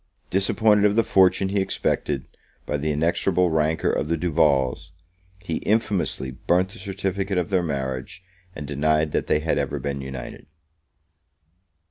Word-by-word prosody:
Disappointed 105 +2 +3
of 105 0 +3
the 115 - +4
fortune 95 -1 +3
he 100 +1 0
expected, 95 - -1 0.4
by 75 - -1
the 75 +2 -2
inexorable 85 +3 +1
rancour 80 0 +1
of 75 - -1
the 85 +1 0
Duvals, 75 -3 +1 0.5
he 85 -4 -2
infamously 100 - 0
burnt 90 +8 0
the 115 +3 -12
certificate 95 0 -2
of 90 +1 -1
their 95 -2 +3
marriage, 65 +1 -4 0.3
and 75 - -6
denied 75 +2 +1
that - - -1
they 75 - +2
had 80 - 0
ever - - -2
been 70 -1 -4
united. 65 -2 -8
85 Hz, 145 wpm, -24 LUFS, 75-95 Hz, 0.5 s, the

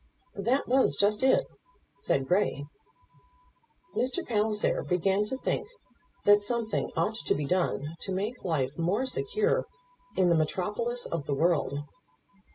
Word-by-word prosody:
"That 245 +7 +1
was 260 +2 +3
just 205 +1 +2
it," 265 0 +4 0.5
said 135 -1 0
Grey. 180 -5 +1 1.3
Mr. 260 +8 0
Palliser 210 -2 +1
began 190 +3 +1
to 260 +5 -3
think 270 - -2 0.6
that 205 0 +7
something 230 +1 -1
ought 215 +1 0
to - - +3
be 145 - -2
done 165 -2 -1
to 195 - -4
make 205 +7 -3
life 145 -4 -1
more 195 +10 +1
secure 420 - 0 0.5
in 185 -2 +4
the 170 - +4
metropolis 210 +10 -1
of 165 -4 -4
the 140 - 0
world. 150 -2 +1
205 Hz, 135 wpm, -29 LUFS, 170-240 Hz, 1.3 s, that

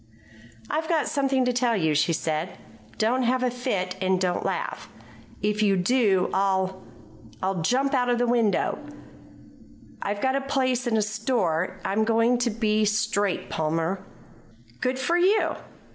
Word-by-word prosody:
"I've 315 +1 -2
got 325 -3 +1
something 270 -2 +1
to 250 - +1
tell 240 -2 +1
you," 160 -4 +1
she 150 +3 +2
said. 155 -1 -2 0.4
"Don't 240 +4 +1
have 255 +1 +1
a 250 - +1
fit, 200 -7 -2
and 185 0 +2
don't 180 -1 0
laugh. - - -3 0.5
If 210 0 0
you 200 -2 +3
do, 195 -1 +2
I'll 190 -1 0 0.6
I'll 190 -2 0
jump 265 - +1
out 250 -2 +2
of 245 - +2
the 245 - +2
window. 235 -3 +1 1.2
I've 205 0 -2
got 265 +4 +1
a 275 - 0
place 260 -2 0
in 225 -2 +1
a 215 - +2
store. 205 -5 -1
I'm 210 +3 +1
going 230 +2 +2
to 245 -1 +1
be 215 -1 +1
straight, 210 -2 0
Palmer." 165 +4 -1 0.8
"Good 255 +1 -1
for 335 +7 +1
you!" 395 +5 +3
220 Hz, 155 wpm, -25 LUFS, 190-255 Hz, 1.2 s, you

